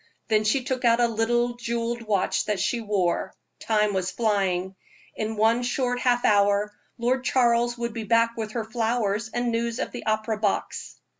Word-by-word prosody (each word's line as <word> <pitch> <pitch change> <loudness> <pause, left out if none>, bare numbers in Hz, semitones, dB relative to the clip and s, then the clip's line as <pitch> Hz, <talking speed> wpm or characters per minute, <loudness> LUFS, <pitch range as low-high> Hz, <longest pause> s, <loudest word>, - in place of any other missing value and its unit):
Then 215 0 +3
she 250 +5 +2
took 260 -1 -3
out 235 0 +4
a 240 - +5
little 240 +2 0
jeweled 235 0 -2
watch 210 -4 0
that 210 -2 -1
she 230 +5 0
wore. 200 -5 -1 0.2
Time 210 -2 +1
was 185 -1 -1
flying. 190 -3 0 0.4
In 220 0 -3
one 225 +3 +3
short 245 0 -1
half 245 -1 +2
hour 205 0 +3 0.3
Lord 255 +2 0
Charles 240 -2 +2
would 235 -1 -3
be 225 -1 -4
back 230 +2 +3
with 220 -2 -5
her 230 -2 -2
flowers 225 -1 -1
and 240 0 -1
news 230 0 -1
of - - -3
the 245 - -8
opera 215 0 0
box. 205 -2 -2
230 Hz, 175 wpm, -25 LUFS, 210-240 Hz, 0.4 s, a